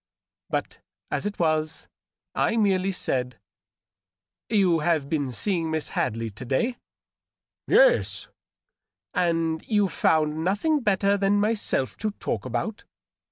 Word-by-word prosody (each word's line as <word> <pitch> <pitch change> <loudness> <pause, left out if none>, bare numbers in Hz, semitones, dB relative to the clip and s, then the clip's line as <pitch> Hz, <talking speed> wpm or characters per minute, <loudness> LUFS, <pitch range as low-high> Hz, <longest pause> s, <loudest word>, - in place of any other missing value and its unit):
But, - - -3 0.3
as - - -1
it 205 - -5
was, 155 -1 0 0.5
I 230 - +1
merely 195 -3 +2
said, 125 -8 -2 0.4
— 95 -2 -68
" 95 0 -68
You 190 -6 +3
have 155 -2 +1
been 145 -4 0
seeing 165 - -1
Miss 160 -1 -2
Hadley 115 -2 -2
to 105 - -9
day 185 - 0 0.4
?" - - -28
JL - - +7
es. - - -5 0.9
"And 165 -3 0
you 205 -3 +3
found 155 -2 +1
nothing 210 - +1
better 200 -3 +2
than 200 +1 +2
myself 210 - 0
to 215 - -1
talk 105 - -3
about?" 130 - -3
165 Hz, 135 wpm, -25 LUFS, 135-205 Hz, 0.9 s, JL